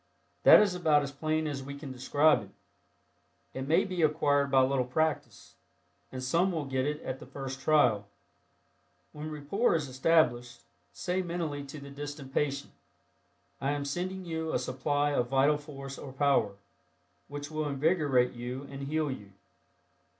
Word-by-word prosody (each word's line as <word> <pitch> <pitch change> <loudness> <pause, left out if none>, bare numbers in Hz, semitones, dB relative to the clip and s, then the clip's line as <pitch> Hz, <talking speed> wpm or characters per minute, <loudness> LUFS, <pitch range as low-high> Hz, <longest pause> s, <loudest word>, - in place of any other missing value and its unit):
That - - +9
is 205 -3 +2
about 155 -5 +3
as 140 - -4
plain 155 +2 -1
as 145 -3 -3
we 140 +1 -7
can 140 -2 -8
describe 140 +2 +3
it. 100 - -12 1.0
It 130 +1 -5
may 160 - +4
be 185 -3 -3
acquired 145 -2 +2
by 135 -1 +5
a - - +5
little 135 -1 +1
practice, 155 +6 -2 0.6
and 130 0 -6
some 170 +9 +2
will 160 -4 -2
get 130 0 -1
it 150 0 -2
at 130 - -4
the - - -11
first 135 -1 -6
trial. 125 -9 +3 1.0
When 150 +1 -7
rapport 155 +9 0
is 155 -3 -1
established, 125 -4 +1 0.3
say 180 +1 -2
mentally 165 -5 -3
to 140 +2 -9
the 140 0 -10
distant 145 -1 -7
patient, 140 -1 -1 0.9
"I 140 +2 +1
am 145 -1 -3
sending 185 +5 -3
you 160 -1 -3
a - - +1
supply 145 +3 0
of 125 -4 +1
vital 140 +3 +3
force 135 -2 -9
or 135 - -8
power, 135 -8 +2 0.7
which 145 +1 -7
will 155 -1 -2
invigorate 140 -3 +2
you 125 +2 -5
and 135 0 -7
heal 155 -1 0
you." 100 -6 -9
145 Hz, 165 wpm, -30 LUFS, 135-155 Hz, 1.0 s, That